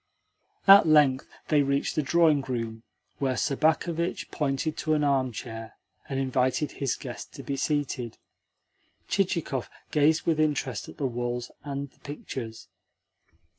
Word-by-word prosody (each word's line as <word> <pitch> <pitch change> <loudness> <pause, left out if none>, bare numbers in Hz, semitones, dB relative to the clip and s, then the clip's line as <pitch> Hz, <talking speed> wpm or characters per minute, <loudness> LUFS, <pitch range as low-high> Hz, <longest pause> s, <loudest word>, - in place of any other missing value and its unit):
At 195 -3 +9
length 145 -4 +4 0.2
they 150 -2 +5
reached 140 0 0
the 155 - +1
drawing 155 0 +4
room, 115 -4 -4 0.4
where 130 -3 0
Sobakevitch 160 +6 0
pointed 145 +2 -1
to 155 -1 +1
an 150 - +1
armchair, 125 -5 -1 0.4
and 135 -1 -1
invited 130 +2 +1
his 135 -4 -1
guest 125 -4 -8
to 140 - -8
be 140 - -3
seated. 135 -5 -2 0.9
Chichikov 170 -9 0 0.2
gazed 155 +1 +3
with 160 -2 +1
interest 155 -2 0
at - - -12
the 140 - -1
walls 120 -1 -3
and 140 -1 -4
the - - -30
pictures. 130 -5 -7
140 Hz, 135 wpm, -27 LUFS, 130-155 Hz, 0.9 s, At